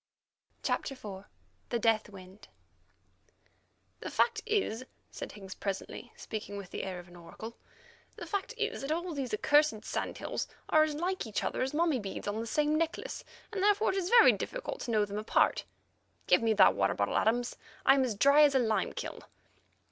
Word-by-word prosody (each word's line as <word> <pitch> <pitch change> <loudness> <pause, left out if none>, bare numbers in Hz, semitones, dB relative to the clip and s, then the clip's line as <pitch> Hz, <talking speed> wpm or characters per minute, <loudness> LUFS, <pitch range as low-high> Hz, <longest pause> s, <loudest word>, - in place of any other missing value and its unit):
CHAPTER 275 - -1
IV. 200 -5 -9 0.4
THE 240 - 0
DEATH 225 -2 +2
WIND 190 0 -13 1.5
"The - - -5
fact 445 -2 +2
is," 390 - 0 0.3
said - - -7
Higgs 195 -2 -9
presently, 200 +4 -5
speaking 210 -2 -6
with 195 -2 -8
the - - -4
air 190 -2 -4
of 175 0 -10
an 175 - -15
oracle, 220 +7 -9 0.6
"the - - -7
fact 405 +4 -3
is 450 0 -2
that 275 +2 -3
all 340 +2 -2
these 270 -4 -3
accursed 260 -1 +3
sand - - -3
hills - - -3 0.2
are 310 - +5
as 310 -1 +1
like 355 -2 -2
each 215 - -2
other - - -2
as 265 +3 -1
mummy 320 -4 +2
beads 200 -1 -6
on 205 +2 -2
the 230 - -4
same 300 +5 +1
necklace, 330 0 -3 0.3
and 410 -3 -3
therefore 415 +1 +3
it - - -4
is 370 -2 -1
very 475 0 +8
difficult - - -4
to - - -6
know 215 -2 +3
them 205 +1 -4
apart. 215 - +2 0.6
Give - - +4
me 225 -1 +3
that 200 -3 +6
water 95 0 +1
bottle, 100 - 0
Adams; 240 +3 +1 0.3
I 270 - +8
am 270 -1 +3
as 240 -5 -1
dry 280 +8 +6
as 290 -2 +5
a - - +5
lime 220 -3 0
kiln." - - -6
245 Hz, 190 wpm, -31 LUFS, 205-315 Hz, 1.5 s, very